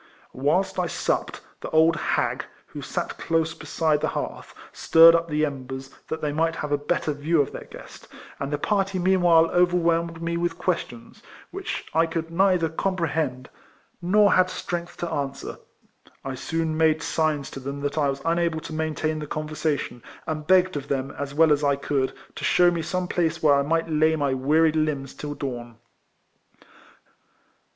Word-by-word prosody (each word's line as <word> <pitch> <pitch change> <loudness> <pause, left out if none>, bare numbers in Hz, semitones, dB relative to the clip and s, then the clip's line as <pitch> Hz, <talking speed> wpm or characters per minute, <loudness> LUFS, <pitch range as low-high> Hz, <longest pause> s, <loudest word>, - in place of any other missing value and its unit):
Whilst 185 +8 0
I 180 - +1
supped, - - -2 0.2
the - - -6
old 160 +1 +4
hag, 155 - -1 0.2
who - - -9
sat - - -4
close 165 0 0
beside 155 -3 0
the - - +1
hearth, - - -5 0.2
stirred 165 0 +7
up 170 0 +1
the 155 -1 +1
embers, 135 -1 -6 0.2
that 160 - -4
they 150 - -1
might 165 +2 0
have 150 -2 -4
a 145 - +3
better 150 0 -1
view 150 +3 0
of 140 - +1
their - - -8
guest, - - -12 0.3
and 140 +1 -3
the 145 - 0
party 195 +3 0
meanwhile 175 -3 +4
overwhelmed 170 -2 +2
me 170 0 -2
with 170 -1 -1
questions, 120 -10 -4 0.3
which - - -5
I 165 +1 +3
could 165 0 -4
neither 180 -1 +3
com 185 +4 -2
prehend 145 -6 -1 0.6
nor 200 +3 +4
had 185 0 +4
strength 175 -1 -5
to 170 -1 -4
answer. 140 -3 -4 0.7
I 135 - -3
soon 160 +4 -2
made 160 0 +2
signs 155 -3 -1
to - - -7
them 140 +2 -6
that 145 0 -2
I 145 -2 +2
was 135 0 -4
unable 170 -1 +1
to 160 - -8
maintain 155 0 -2
the 150 - -6
conversation, 150 -4 -3 0.2
and 155 -1 -4
begged 185 -1 +4
of 145 -1 -4
them, 135 -1 -2
as 140 0 -6
well 160 0 +5
as 145 0 -1
I 140 -1 +3
could, 140 -1 -1 0.2
to - - -7
shew 175 -1 +4
me 170 -1 -2
some 180 +2 -2
place 165 -3 -1
where 150 -2 +6
I 140 - +4
might 165 +3 0
lay 160 0 +2
my 140 -3 0
wearied 155 +4 +2
limbs 150 -4 -1
till 145 0 -6
dawn. 120 -5 -6
160 Hz, 175 wpm, -24 LUFS, 145-170 Hz, 0.7 s, stirred